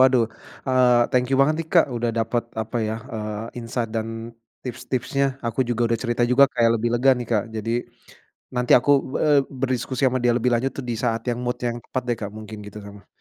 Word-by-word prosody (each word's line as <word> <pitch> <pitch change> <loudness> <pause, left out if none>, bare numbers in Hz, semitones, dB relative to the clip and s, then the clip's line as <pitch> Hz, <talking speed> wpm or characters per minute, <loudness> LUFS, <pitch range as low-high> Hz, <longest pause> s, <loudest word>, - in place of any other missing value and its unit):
Waduh, 130 -3 +5 0.4
eee, 125 -2 +5
thank 125 0 +2
you - - +3
banget 145 +3 +4
nih, 165 - -3
Kak, 170 - +6
udah 120 0 0
dapat, 115 +1 0 0.2
apa 110 +3 -6
ya, 110 - -1 0.2
eee, 110 +2 -5
insight 115 0 -3
dan 110 0 -1 0.6
tips-tipsnya. 130 +2 -2 0.2
Aku 115 +2 -1
juga 120 -1 -1
udah 115 - +2
cerita 120 -1 0
juga 135 +2 +7
kayak 115 -1 +4
lebih 120 +2 0
lega 130 +3 +4
nih 120 - -5
Kak. 105 -2 +2
Jadi 110 +1 -3 0.9
nanti 125 0 +2
aku 130 +4 0 0.2
be - - 0
eee, 145 -2 +5 0.2
berdiskusi 130 -1 -1
ama 130 0 -1
dia 120 - +5
lebih 125 +1 +1
lanjut 130 +3 0
tuh 135 - -4
di - - -1
saat 115 -1 +1
yang 120 -1 0
mood 125 0 -2
yang 120 - -3
tepat 130 - -3
deh 120 - +1
Kak 100 -2 -4
mungkin 110 0 -8
gitu 105 +1 -9
sama 100 -1 -12
120 Hz, 215 wpm, -23 LUFS, 115-130 Hz, 0.9 s, juga